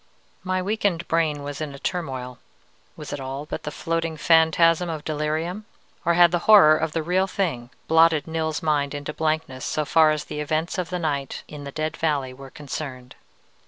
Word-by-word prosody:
"My 185 0 -1
weakened 195 -4 -1
brain 155 -3 0
was 145 +1 -6
in 145 -3 -4
a - - -9
turmoil. 130 -7 -4 0.6
Was - - -7
it 145 - -4
all 135 +2 -5
but 155 - -5
the 150 - -5
floating 165 +1 -2
phantasm 165 +2 +4
of 155 -2 -4
delirium? 160 +6 -2 0.4
Or 170 0 +3
had 175 -1 +6
the 175 - +1
horror 185 -8 +9
of 155 0 -2
the 165 - -1
real 185 +4 +1
thing 160 -12 -2 0.2
blotted 160 -2 +4
Nils's 160 -1 -2
mind 145 -2 0
into 145 +1 -5
blankness 155 -5 -2
so 155 - -1
far 155 +2 +5
as 155 -1 0
the 150 - -6
events 155 +4 -1
of 175 -2 -3
the 180 - -2
night 145 -5 -3
in 145 -1 -9
the 140 - -6
Dead 155 +2 -3
Valley 145 -5 -1
were 135 +1 -11
concerned? 135 -3 -7
155 Hz, 190 wpm, -24 LUFS, 145-165 Hz, 0.6 s, horror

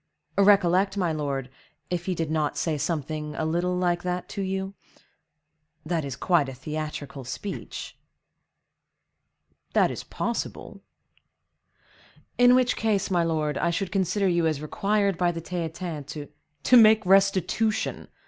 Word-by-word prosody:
Recollect, 195 -1 +4
my 180 -4 +1
lord, 140 -4 -2 0.4
if 175 0 -2
he 185 - 0
did 160 -2 -2
not 155 -2 0
say 160 -2 0
something 150 0 -3
a 160 - -2
little 175 +3 0
like 175 -1 +1
that 180 0 -3
to 200 - -4
you?—that 160 -4 -7
is 135 -2 -5
quite 165 -7 +2
a 135 - -8
theatrical 150 -1 -5
speech." 195 +10 -6 1.7
"That - - +3
is - - -6
possible." - - -4 1.6
"In 245 0 +7
which 255 -1 +3
case, 205 -3 0
my 175 -2 +3
lord, 155 -2 -1
I 170 - +1
should 175 +2 -2
consider 195 +1 +1
you 170 -2 +2
as 155 -3 -1
required 200 +4 0
by 175 -1 +3
the 165 - -5
Theatin 165 -2 -4
to—" 150 0 -7 0.3
"To 250 - +6
make 220 -2 +6
restitution!" 195 +3 +2
175 Hz, 135 wpm, -26 LUFS, 155-195 Hz, 1.7 s, In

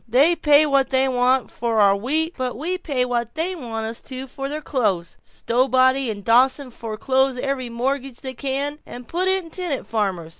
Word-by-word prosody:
They 280 +9 +4
pay 295 -2 +5
what 275 -2 +2
they 265 0 +2
want 255 0 +2
to - - -19
for 230 -2 0
our 200 -1 +5
wheat, 310 - -1
but 255 -3 -3
we 355 +7 -2
pay 275 -8 -1
what 240 0 -2
they 335 +4 0
want 225 -7 -5
us 225 +1 -6
to 260 0 -7
for 270 +1 -6
their 300 +2 -3
clothes. 205 - -1
Stowbody 260 +1 +1
and 205 -2 -5
Dawson 255 +4 +3
foreclose 260 +4 -1
every 260 -1 -2
mortgage 260 +2 -3
they 260 -1 -5
can, 280 +3 -2
and 245 -1 -10
put 360 +2 -1
in 375 -3 +1
tenant 350 -7 -3
farmers. 190 -7 -2
260 Hz, 190 wpm, -22 LUFS, 235-285 Hz, -, pay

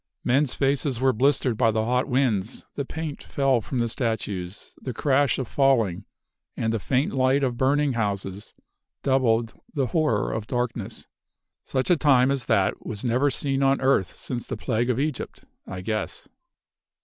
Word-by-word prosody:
Men's 135 +2 +2
faces 135 -2 0
were 130 0 +3
blistered 130 -1 +2
by 115 - +4
the 110 0 0
hot 125 +2 +1
winds; 125 -5 0
the 140 - -3
paint 155 0 -5
fell 135 -4 +1
from 130 - -5
the 120 -1 +1
statues; 105 -6 -4
the 130 -3 -5
crash 140 0 +2
of 130 - -3
falling, 115 -10 +2 0.5
and 110 0 0
the 115 - 0
faint 130 +6 0
light 135 +1 +2
of 125 -3 0
burning 140 +2 +2
houses 100 -2 -3 0.5
doubled 120 -4 +2 0.2
the 140 -3 +1
horror 150 -11 +1
of 110 -1 -4
darkness. 120 -3 -3 0.6
Such 130 +6 0
a 175 - +5
time 135 -3 +4
as 135 -5 -2
that 95 -1 +1
was 105 +2 -5
never 125 +4 +2
seen 135 0 -1
on 135 0 +3
earth 130 -8 +1
since 120 -2 -5
the 125 - -4
plague 120 +2 -1
of 125 0 +1
Egypt, 150 -1 -3 0.2
I 95 -1 -6
guess! 110 +2 -4
125 Hz, 165 wpm, -25 LUFS, 110-135 Hz, 0.6 s, a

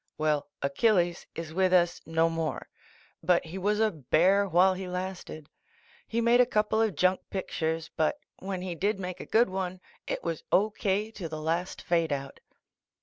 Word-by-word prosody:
Well, 150 -2 0
Achilles 175 +4 +2
is 165 -1 -6
with 185 +1 +2
us 175 -1 +3
no 165 0 +3
7Tiore. 165 -1 -2 0.6
But 175 +1 +2
he 175 +4 -6
was 210 +3 +1
a 220 -1 +3
bear 180 +6 +3
while 185 +2 +5
he 185 0 -6
lasted. 180 -4 -5 0.6
He 230 +1 -1
made 235 +1 +5
a - - +5
coupk 210 -3 0
of 220 -4 +2
junk 185 +4 +3
pictures, 160 -4 -3
but 160 - +1 0.2
svhen 190 -1 -4
he 185 -2 -3
did 195 +4 -1
make 180 -1 -5
a - - -8
good 230 0 +4
one. 185 -1 -3 0.3
it - - -3
was 165 -2 -3
C>. 210 +3 +4
K. 205 +2 0
to 180 -7 -6
the 155 0 -5
last 165 +4 -2
fadeout. 155 -5 0
180 Hz, 175 wpm, -28 LUFS, 165-195 Hz, 0.6 s, while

